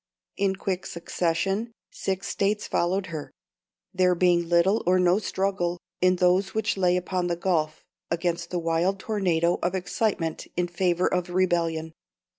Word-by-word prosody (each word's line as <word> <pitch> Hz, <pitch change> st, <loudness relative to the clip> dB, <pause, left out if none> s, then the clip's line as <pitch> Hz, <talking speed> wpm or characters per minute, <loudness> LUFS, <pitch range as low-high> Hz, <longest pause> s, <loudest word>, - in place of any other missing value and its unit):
In 195 Hz, -1 st, +1 dB
quick 190 Hz, -1 st, -3 dB
succession 185 Hz, +6 st, -1 dB, 0.2 s
six 190 Hz, 0 st, -3 dB
States 205 Hz, +1 st, 0 dB
followed 185 Hz, +3 st, 0 dB
her, 150 Hz, -2 st, -5 dB, 0.6 s
"there 180 Hz, -1 st, +3 dB
being 175 Hz, -1 st, +2 dB
little 175 Hz, +5 st, +3 dB
or 185 Hz, +1 st, +5 dB
no 180 Hz, +2 st, +4 dB
struggle, 190 Hz, -3 st, -1 dB, 0.2 s
in 185 Hz, 0 st, +4 dB
those 180 Hz, +2 st, +2 dB
which 220 Hz, -1 st, 0 dB
lay 180 Hz, -2 st, +2 dB
upon 180 Hz, 0 st, -1 dB
the 170 Hz, -, 0 dB
Gulf, 165 Hz, -3 st, -1 dB, 0.3 s
against 170 Hz, 0 st, -1 dB
the 180 Hz, -, -2 dB
wild 170 Hz, +3 st, +1 dB
tornado 175 Hz, -6 st, +1 dB
of 180 Hz, +2 st, 0 dB
excitement 180 Hz, -3 st, -1 dB
in 175 Hz, 0 st, +1 dB
favour 175 Hz, 0 st, +1 dB
of 180 Hz, 0 st, 0 dB
rebellion." 170 Hz, -3 st, 0 dB
180 Hz, 145 wpm, -26 LUFS, 170-190 Hz, 0.6 s, or